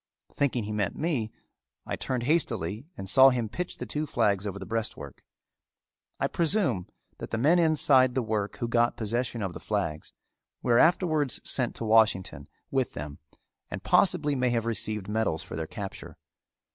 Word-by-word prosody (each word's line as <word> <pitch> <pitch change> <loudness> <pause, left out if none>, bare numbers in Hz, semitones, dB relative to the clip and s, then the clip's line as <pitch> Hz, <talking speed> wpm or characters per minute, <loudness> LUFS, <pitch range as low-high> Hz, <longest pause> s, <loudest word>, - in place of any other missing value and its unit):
Thinking 130 -5 0
he 105 - -5
meant 105 -3 -1
me, 140 -10 -1 0.5
I - - -3
turned 125 -2 -3
hastily 120 - -1
and 95 - -6
saw 135 +6 +7
him 120 -3 -1
pitch 180 +11 -5
the 125 - -5
two 150 +7 -3
flags 105 -5 +1
over 100 -1 -5
the 95 - -7
breastwork. 115 +1 -5 1.0
I - - +1
presume 165 - +1 0.3
that - - -6
the 115 - -2
men 155 +9 +4
inside 145 -6 +4
the 130 - +1
work 105 -2 -2
who 120 - -2
got 120 0 +2
possession 115 0 -2
of 95 -3 -3
the - - -8
flags 75 0 -3 0.5
were 120 -1 +4
afterwards 160 -5 +3
sent 125 -3 0
to 115 - -5
Washington 110 -4 +2 0.2
with 135 -2 0
them 75 0 -7 0.5
and - - -6
possibly 145 0 +3
may 130 -2 +1
have 115 -1 0
received 110 -2 -2
medals 105 -7 -1
for - - -8
their 80 0 -4
capture. 100 +2 -8
115 Hz, 170 wpm, -28 LUFS, 105-135 Hz, 1.0 s, saw